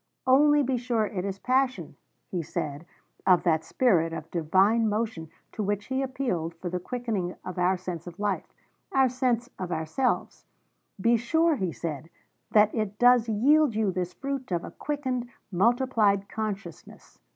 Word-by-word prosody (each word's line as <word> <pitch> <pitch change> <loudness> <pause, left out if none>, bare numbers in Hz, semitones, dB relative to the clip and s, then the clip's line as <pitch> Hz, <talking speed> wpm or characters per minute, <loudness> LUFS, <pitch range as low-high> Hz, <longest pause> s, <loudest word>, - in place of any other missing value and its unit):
'Only 290 +3 +5
be 260 -1 0
sure 235 -2 0
it 195 -4 -4
is 195 -1 -3
passion,' 250 - 0 0.4
he 180 - -1
said 150 0 -5 0.4
of 180 -2 +5
that 160 -2 +2
spirit 170 -10 +2
of 160 -1 -7
divine 190 +7 +3
motion 210 -7 -2 0.2
to - - -5
which 205 0 -1
he 265 0 -1
appealed 240 -12 -2
for 175 +1 -6
the 180 - -2
quickening 215 -5 -3
of 185 0 -5
our 180 +1 +2
sense 180 -2 -6
of 175 +2 -10
life, 205 -2 -2 0.4
our 265 -1 +4
sense 245 -1 -1
of 180 -1 -4
ourselves; 160 +11 -1 0.5
be 230 +4 +4
sure, 320 +8 +2
he 190 -9 -2
said, 160 -1 -5 0.4
'that 210 0 +4
it 215 -2 -2
does 245 -1 +5
yield 270 +4 +4
you 215 -3 +1
this 180 -1 -3
fruit 275 -4 -4
of 175 -1 0
a - - -7
quickened, 260 -5 -3 0.2
multiplied 210 -1 +2
consciousness.' 200 -6 -7
210 Hz, 160 wpm, -27 LUFS, 180-250 Hz, 0.5 s, Only